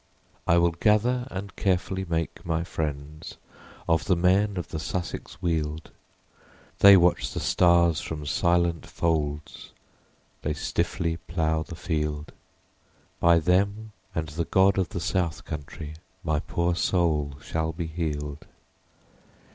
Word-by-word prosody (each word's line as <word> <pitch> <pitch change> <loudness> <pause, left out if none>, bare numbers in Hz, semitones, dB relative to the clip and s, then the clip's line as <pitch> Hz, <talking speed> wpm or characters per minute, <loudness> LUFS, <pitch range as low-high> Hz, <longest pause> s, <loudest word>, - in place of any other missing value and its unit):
32 - - +3
I 85 - +6
will 85 0 +4
gather 115 +7 +2
and 95 -2 -6
carefully 95 0 0
make 85 -2 -3
my 80 -1 -1
friends 75 -2 -5 0.5
Of 80 -1 +2
the 90 - +3
men 95 +3 +2
of 90 - -4
the 80 - -4
Sussex 90 +3 -5
Weald, 80 -2 -2 0.9
They 100 -1 +9
watch 90 0 +2
the - - -2
stars 85 -2 +3
from 75 -2 -5
silent 85 +1 +1
folds, 75 -3 -2 0.7
They 75 0 -2
stiffly 80 +2 -1
plough 80 -1 -1
the 85 - -7
field, 75 -3 -2 0.9
By 85 0 +5
them 100 +6 +1 0.2
and 80 -1 -2
the 80 +3 -2
God 95 +2 +4
of 90 -4 0
the - - -4
South 85 -2 -1
Country 75 +1 -7 0.3
My 75 -1 +1
poor 85 +3 0
soul 80 -5 +1
shall 80 0 -2
be 85 +1 -4
healed. 75 -3 -4
85 Hz, 130 wpm, -26 LUFS, 80-90 Hz, 0.9 s, They